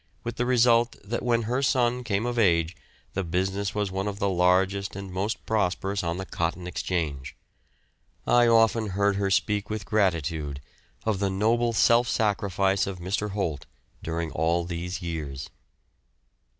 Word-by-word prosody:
with 120 Hz, 0 st, -5 dB
the 120 Hz, -, 0 dB
result 120 Hz, -1 st, +4 dB
that 115 Hz, +4 st, -3 dB
when 120 Hz, -1 st, +1 dB
her 125 Hz, +5 st, -1 dB
son 125 Hz, -2 st, +2 dB
came 105 Hz, -2 st, -1 dB
of 120 Hz, -1 st, -1 dB
age 85 Hz, -5 st, +3 dB, 0.4 s
the 95 Hz, -, -1 dB
business 95 Hz, +4 st, -1 dB
was 105 Hz, -2 st, -1 dB
one 95 Hz, +1 st, -2 dB
of 100 Hz, -1 st, -3 dB
the 100 Hz, -, 0 dB
largest 95 Hz, +2 st, +2 dB
and 100 Hz, -2 st, -7 dB
most 100 Hz, +5 st, -2 dB
prosperous 100 Hz, -2 st, 0 dB
on 85 Hz, 0 st, -2 dB
the 95 Hz, -, -4 dB
Cotton 85 Hz, 0 st, -2 dB
Exchange. 80 Hz, -7 st, -3 dB, 0.9 s
I 120 Hz, 0 st, +5 dB
often 115 Hz, -1 st, +4 dB
heard 100 Hz, -1 st, +2 dB
her 100 Hz, -1 st, 0 dB
speak 105 Hz, +1 st, +1 dB
with 105 Hz, -2 st, -4 dB
gratitude 80 Hz, -9 st, 0 dB, 0.5 s
of 110 Hz, -4 st, 0 dB
the 100 Hz, -1 st, +1 dB
noble 115 Hz, +5 st, +2 dB
self 115 Hz, +2 st, +4 dB
sacrifice 100 Hz, -3 st, +1 dB
of 95 Hz, -2 st, -4 dB
Mr. 95 Hz, +4 st, -2 dB
Holt 90 Hz, -8 st, -3 dB, 0.3 s
during 80 Hz, 0 st, -3 dB
all 85 Hz, +3 st, +1 dB
these 90 Hz, +1 st, -4 dB
years. 75 Hz, -6 st, -5 dB
100 Hz, 155 wpm, -26 LUFS, 90-110 Hz, 0.9 s, I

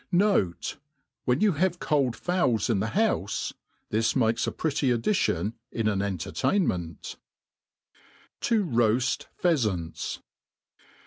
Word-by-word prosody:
Note, 175 Hz, -, +1 dB, 0.5 s
When 125 Hz, +2 st, +2 dB
you 210 Hz, -1 st, +5 dB
have 175 Hz, +2 st, +1 dB
cold 140 Hz, -8 st, +1 dB
fowls 125 Hz, -, +1 dB
in 105 Hz, -, +1 dB
the 105 Hz, -, 0 dB
houfe^ 190 Hz, -, 0 dB, 0.4 s
this 110 Hz, +1 st, +1 dB
makes 115 Hz, -3 st, +2 dB
a -, -, 0 dB
pretty 145 Hz, -3 st, 0 dB
addition 115 Hz, -, +1 dB, 0.2 s
in 115 Hz, -2 st, -1 dB
an 100 Hz, -2 st, +1 dB
entertainment* 90 Hz, -, -1 dB, 1.2 s
T$ 230 Hz, -, +2 dB
r$q/f 125 Hz, -, +2 dB, 0.3 s
Pheafants. 105 Hz, -, 0 dB
120 Hz, 110 wpm, -27 LUFS, -, 1.2 s, you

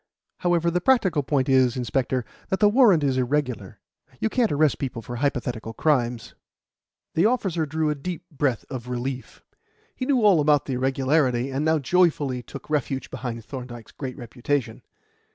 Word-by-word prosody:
However, 170 Hz, -1 st, +1 dB
the 180 Hz, +1 st, 0 dB
practical 185 Hz, -, +3 dB
point 135 Hz, -1 st, 0 dB
is, 130 Hz, -2 st, +3 dB
inspector, 125 Hz, +1 st, -1 dB, 0.2 s
that 190 Hz, -, 0 dB
the 210 Hz, -, +6 dB
warrant 210 Hz, -, +5 dB
is 135 Hz, -2 st, +1 dB
irregular. 125 Hz, -6 st, -2 dB, 0.4 s
You 220 Hz, -, 0 dB
can't 235 Hz, -1 st, +1 dB
arrest 150 Hz, -1 st, +2 dB
people 125 Hz, -4 st, -4 dB
for 120 Hz, -1 st, -6 dB
hypothetical 120 Hz, -4 st, -2 dB
crimes." 120 Hz, -4 st, 0 dB, 0.8 s
The 170 Hz, +6 st, +4 dB
officer 190 Hz, -10 st, 0 dB
drew 155 Hz, +1 st, 0 dB
a -, -, +1 dB
deep 170 Hz, +4 st, -6 dB
breath 135 Hz, -6 st, -1 dB
of 125 Hz, -2 st, -6 dB
relief. 125 Hz, +1 st, -5 dB, 0.5 s
He 255 Hz, -, -4 dB
knew 260 Hz, -5 st, +2 dB
all 195 Hz, -6 st, +6 dB
about 150 Hz, -1 st, +3 dB
the 135 Hz, -, -3 dB
irregularity, 130 Hz, 0 st, +1 dB
and 135 Hz, +3 st, -1 dB
now 160 Hz, +1 st, +3 dB
joyfully 145 Hz, -4 st, +1 dB
took 140 Hz, -, -10 dB
refuge 140 Hz, -3 st, -2 dB
behind 115 Hz, -3 st, -5 dB
Thorndyke's 120 Hz, -3 st, -8 dB
great 130 Hz, -3 st, -6 dB
reputation. 125 Hz, +3 st, -3 dB
140 Hz, 160 wpm, -24 LUFS, 125-160 Hz, 0.8 s, the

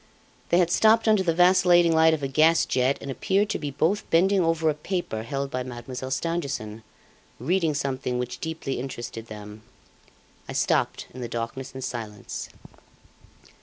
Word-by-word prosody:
They 170 Hz, -, +4 dB
had 175 Hz, -1 st, +3 dB
stopped 220 Hz, +3 st, +4 dB
under 215 Hz, -3 st, +5 dB
the 180 Hz, -3 st, +1 dB
vacillating 175 Hz, -1 st, +5 dB
light 160 Hz, 0 st, +5 dB
of 145 Hz, -, -8 dB
a -, -, +1 dB
gas 155 Hz, +5 st, +4 dB
jet 130 Hz, +2 st, +1 dB
and 140 Hz, -, -5 dB
appeared 200 Hz, +9 st, 0 dB
to -, -, -2 dB
be 145 Hz, -, -3 dB
both 160 Hz, +9 st, 0 dB
bending 190 Hz, +4 st, +4 dB
over 165 Hz, -1 st, +1 dB
a 155 Hz, -, +3 dB
paper 150 Hz, -, -3 dB
held 135 Hz, +4 st, -4 dB
by 130 Hz, -, -2 dB
Mademoiselle 125 Hz, +1 st, -6 dB
Stangerson, 135 Hz, -8 st, -3 dB, 0.6 s
reading 165 Hz, +2 st, +1 dB
something 130 Hz, -3 st, -2 dB
which 125 Hz, 0 st, -4 dB
deeply 160 Hz, -5 st, -4 dB
interested 120 Hz, -3 st, -6 dB
them. 105 Hz, 0 st, -10 dB, 0.9 s
I -, -, -4 dB
stopped -, -, 0 dB
in 130 Hz, -, -8 dB
the 120 Hz, -, -3 dB
darkness 120 Hz, +3 st, -5 dB
and 130 Hz, -, -6 dB
silence. 110 Hz, -5 st, -6 dB
140 Hz, 165 wpm, -25 LUFS, 125-170 Hz, 0.9 s, under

